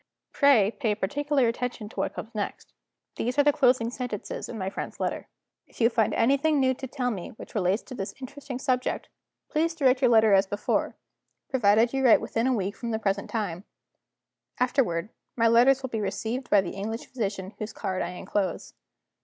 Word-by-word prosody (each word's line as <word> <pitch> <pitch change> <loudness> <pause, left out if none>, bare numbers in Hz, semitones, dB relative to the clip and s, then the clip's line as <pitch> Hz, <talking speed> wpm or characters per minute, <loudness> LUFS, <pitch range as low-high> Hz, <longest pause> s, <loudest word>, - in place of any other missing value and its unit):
Pray 250 -8 +5
pay 225 -4 -1
particular 275 +6 +1
attention 235 -2 -3
to - - -15
what - - -2
comes 225 - -7
next. 210 -2 -5 0.4
These 245 +3 -2
are 285 - +6
the 290 0 +4
closing 250 -5 +3
sentences 245 -5 -5
in 235 - -6
my 190 -2 -3
friend's 195 - -5
letter: - - -2 0.4
"'If - - -19
you 230 0 +4
find 225 -2 +1
anything 280 +5 +3
new 260 -1 +3
to 265 +1 -7
tell 250 -1 -2
me 190 -6 -5
which - - -11
relates 195 0 +1
to - - -10
this 195 -4 -5
interesting 270 0 -7
subject, 255 -1 -1 0.4
direct 305 -5 +2
your 250 - +5
letter 220 -3 +5
as 195 0 +4
before 205 +2 -1 0.6
provided 230 -1 +3
you 270 0 0
write 245 - +7
within 230 +2 -1
a 260 - +2
week 200 -1 -2
from 235 - -5
the 220 - 0
present 200 -2 -1
time. 195 -5 -3 1.0
Afterward, 230 -8 +1 0.3
my 230 -1 +4
letters 250 +4 +5
will 260 - -4
be 220 - -2
received 220 +6 -3
by 205 - +5
the 185 - -5
English 220 +4 -5
physician 200 -5 -4
whose 215 +1 -4
card 190 -4 -3
I - - -2
inclose. 180 0 -3
230 Hz, 185 wpm, -27 LUFS, 205-260 Hz, 1.0 s, write